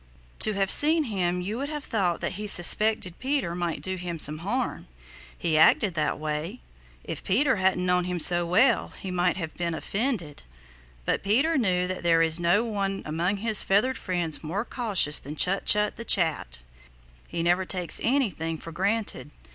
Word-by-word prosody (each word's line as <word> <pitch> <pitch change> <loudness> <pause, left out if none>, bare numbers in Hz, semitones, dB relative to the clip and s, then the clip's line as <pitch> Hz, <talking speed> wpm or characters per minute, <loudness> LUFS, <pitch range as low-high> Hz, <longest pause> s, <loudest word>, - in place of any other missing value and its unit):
To 215 - +1
have 195 -1 0
seen 315 +2 +5
him 180 -7 -2
you 210 +6 -4
would 280 +1 -4
have 300 -2 -5
thought 185 - -1
that - - -2
he 210 +2 -6
suspected 195 0 +4
Peter 260 -10 -2
might 175 -2 -4
do 185 0 -2
him 175 -2 -5
some 155 0 0
harm. 235 +9 -3 0.5
He 160 -3 0
acted 190 +4 +4
that 155 -2 -1
way. 155 +8 -5 0.4
If - - -7
Peter 255 +5 +1
hadn't 185 -1 0
known 180 0 +1
him 180 -1 -3
so 175 +1 +3
well 225 +8 +2
he 190 - -6
might 180 0 0
have 160 -4 -5
been 170 -2 -3
offended. 200 - -3 0.6
But - - -1
Peter 265 +12 +1
knew 185 -8 +1
that 185 0 -5
there 165 -1 +3
is 160 +1 +2
no 175 +6 +2
one 200 -4 -3
among 170 +6 -2
his 220 0 +5
feathered 215 +7 +1
friends 175 -5 0
more 190 +9 -3
cautious 205 - +1
than 145 +2 -9
Chut 190 +5 +1
Chut 210 0 +2
the 230 - -6
Chat. 160 - -3 0.6
He 165 - -4
never 175 +2 +2
takes 180 -2 -1
anything 195 - -1
for 165 - -10
granted. 205 +5 -2
185 Hz, 180 wpm, -25 LUFS, 170-215 Hz, 0.6 s, seen